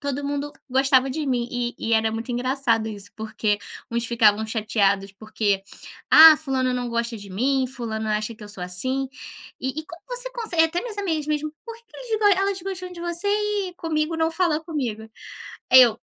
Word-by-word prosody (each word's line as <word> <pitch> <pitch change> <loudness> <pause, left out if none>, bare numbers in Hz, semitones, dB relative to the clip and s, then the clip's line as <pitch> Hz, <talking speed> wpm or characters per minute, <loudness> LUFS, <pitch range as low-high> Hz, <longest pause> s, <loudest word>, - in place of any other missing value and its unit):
todo 285 0 -3
mundo 285 +1 -3 0.2
gostava 265 0 +3
de 300 +2 -3
mim. 245 -3 0
E 245 0 -2
e 230 - -2
era 220 0 +2
muito 225 +2 -4
engraçado 245 -3 0
isso, 205 -2 -8
porque 215 -1 -1 0.3
uns 235 0 -1
ficavam 220 -2 +3
chateados 205 -3 0
porque: 205 -1 -1 0.5
"Ah, 320 0 +10
fulana 265 -4 -1
não 245 -1 -3
gosta 235 0 -2
de 200 -1 -11
mim. 260 +7 +1
Fulana 220 -4 -3
acha 215 +2 -5
que 215 - -15
eu - - -11
sou 195 -4 -5
assim. 260 +10 -1 0.5
E 265 - -1
e - - -12
como 335 0 -12
você - - +2
consegue?" 440 -9 +1
Até 335 +2 -1
minhas 460 -4 -5
amigas 325 -7 -1
mesmo: 305 0 -2
"Por 460 - -7
que 465 - -21
que 440 - -17
eles 435 -5 +2
elas 390 -1 -1
gostam 370 -1 -5
de 345 - -9
você 345 +3 0
e 415 -3 -1
comigo 320 -1 -1
não 325 0 +1
fala 330 -2 +1
comigo?" 260 -10 -3 0.7
Aí, 255 0 +10
eu 230 -2 +4
265 Hz, 195 wpm, -23 LUFS, 225-330 Hz, 0.7 s, Ah